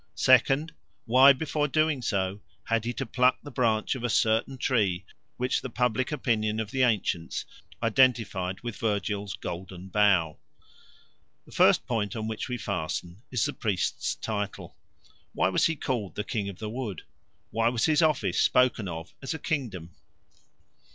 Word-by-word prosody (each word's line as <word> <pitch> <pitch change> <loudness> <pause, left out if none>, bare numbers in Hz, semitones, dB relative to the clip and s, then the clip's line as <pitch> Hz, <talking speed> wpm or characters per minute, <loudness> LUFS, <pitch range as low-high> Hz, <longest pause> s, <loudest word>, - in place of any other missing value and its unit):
second, 135 - +4 0.3
why 130 +4 +7
before 150 +1 0
doing 155 -1 +1
so 100 -3 -1 0.2
had 115 -1 0
he 120 - -1
to 135 +2 -4
pluck 125 +2 +3
the 145 - -9
branch 115 -4 +1
of 130 -3 -6
a 120 - 0
certain 115 +5 +1
tree 100 -8 0 0.3
which 125 +1 0
the 130 - -5
public 125 +3 0
opinion 110 -6 0
of 110 -1 -4
the 130 - 0
ancients 105 -8 0 0.4
identified 115 -6 +2
with 120 -3 -5
Virgil's 100 -3 -2
Golden 90 +1 -7
Bough? 95 -7 +3 1.1
The - - -17
first - - +4
point 105 -4 -2
on 110 -1 -3
which 110 +3 -4
we 125 - -2
fasten 90 -2 -4
is 125 -4 0
the - - -2
priest's 100 -7 -1
title. 105 -2 -5 0.6
Why 90 - +2
was 95 - +3
he 165 - -1
called 120 -8 -3
the 105 - -2
King 105 -2 -3
of 95 - -9
the 110 - -5
Wood? 115 -7 -5 0.5
Why 115 +1 +2
was 120 -1 0
his 155 -1 +3
office 155 -4 +2
spoken 125 -5 +3
of 80 0 -7
as 135 +3 -3
a - - -3
kingdom? 110 - -3
115 Hz, 160 wpm, -27 LUFS, 100-130 Hz, 1.1 s, why